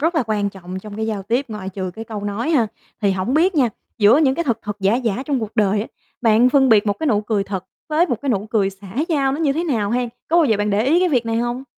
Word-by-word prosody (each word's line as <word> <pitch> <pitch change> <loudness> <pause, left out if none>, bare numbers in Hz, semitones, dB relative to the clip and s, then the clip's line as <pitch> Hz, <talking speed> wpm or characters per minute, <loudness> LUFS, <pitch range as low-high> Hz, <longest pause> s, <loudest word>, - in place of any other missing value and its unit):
rất 325 +4 +1
là 320 - +2
quan 205 -2 0
trọng 185 -1 -8
trong 205 +1 -9
cái 220 0 -2
giao 210 -3 -3
tiếp, 235 +7 0
ngoại 210 -4 -6
trừ 190 -1 -4
cái 225 - -7
câu 215 -3 -6
nói 205 +9 -2
ha. 260 -9 +3 0.3
Thì 200 -2 +2
hổng 190 +7 -1
biết 350 +5 +3
nha, 270 -6 +3 0.3
giữa 215 +6 +6
những 275 -4 +3
cái 340 - -2
thật 235 -6 0
thật 210 -1 -5
giả 195 +3 +3
giả 240 -1 -1
trong 275 -4 0
cuộc 220 +1 -6
đời 205 -1 +2
á 215 - -4 0.3
bạn 230 +1 +4
phân 265 0 +4
biệt 220 -2 +4
một 205 - +3
cái 320 - -2
nụ 215 -7 +2
cười 210 -2 -1
thật 195 -2 -5 0.2
với 310 +3 +3
một 245 - -1
cái 285 - -3
nụ 210 -4 0
cười 200 -4 +2
xã 195 0 -14 0.2
giao 280 -5 +1
nó 280 - -3
như 295 -4 +2
thế 325 +5 -2
nào 225 -11 0
hen, 245 +1 0 0.2
có 335 - +2
bao 340 - +5
giờ 225 -7 +2
bạn 205 +1 -1
để 205 +2 +1
ý 320 +6 +4
cái 365 - +3
việc 250 -7 +1
này 225 0 0
hông? 240 +2 -2
225 Hz, 300 wpm, -20 LUFS, 205-270 Hz, 0.3 s, giữa